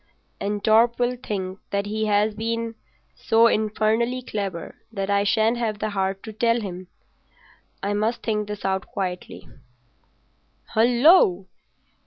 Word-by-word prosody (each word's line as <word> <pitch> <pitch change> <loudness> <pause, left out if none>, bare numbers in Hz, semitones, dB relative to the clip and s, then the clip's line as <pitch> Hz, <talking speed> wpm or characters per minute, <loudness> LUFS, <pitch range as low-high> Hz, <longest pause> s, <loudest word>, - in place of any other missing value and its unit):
"And 205 0 -3
Torp 225 +2 +4
will 245 0 0
think 195 -6 -5
that 200 0 -1
he 215 +1 -2
has 210 +1 +2
been 230 +1 -3 0.4
so 225 +1 +3
infernally 220 +3 +1
clever 195 -7 -4 0.2
that 195 -2 -3
I 200 0 +3
shan't 220 +3 +2
have 220 -3 -1
the 215 0 -3
heart 195 -1 -2
to 220 - -8
tell 230 +2 +2
him. 185 -4 -7 1.0
I 200 +1 0
must 215 +3 -1
think 210 -2 -1
this 210 -1 -6
out 190 0 -1
quietly." 180 -2 -5 1.3
"Hullo!" 235 - +5
215 Hz, 135 wpm, -24 LUFS, 200-230 Hz, 1.3 s, Hullo